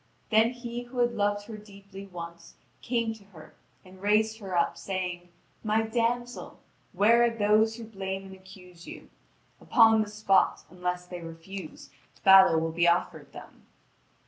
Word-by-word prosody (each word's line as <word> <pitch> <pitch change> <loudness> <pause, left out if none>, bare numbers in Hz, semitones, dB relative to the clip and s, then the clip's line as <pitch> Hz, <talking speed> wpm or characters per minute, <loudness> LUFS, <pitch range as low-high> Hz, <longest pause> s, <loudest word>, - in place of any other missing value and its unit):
Then 220 +1 +5
he 240 -1 -6
who 245 +1 -12
had 240 -1 +2
loved 205 -1 -1
her 220 -1 -8
deeply 200 -1 -13
once 170 -2 -10 0.3
came 230 -2 -1
to 220 -2 -16
her 175 -6 -15 0.3
and 185 0 -16
raised 215 +2 +1
her 190 -4 -4
up, 170 - +1
saying: 180 -2 -5 0.3
"My 220 0 +1
damsel, 240 +2 -3 0.3
where 225 +5 +4
are 235 - +4
those 220 0 +2
who 230 - -9
blame 195 -3 -6
and 190 - -11
accuse 185 -2 -15
you? - - -11 0.5
Upon 225 -2 +5
the 215 - -3
spot, 210 -2 +1
unless 180 0 -4
they 180 -1 -8
refuse, 165 -2 -10 0.3
battle 190 -4 +7
will 165 0 -2
be 170 +1 +1
offered 170 +1 0
them." - - -14
200 Hz, 155 wpm, -27 LUFS, 180-225 Hz, 0.5 s, battle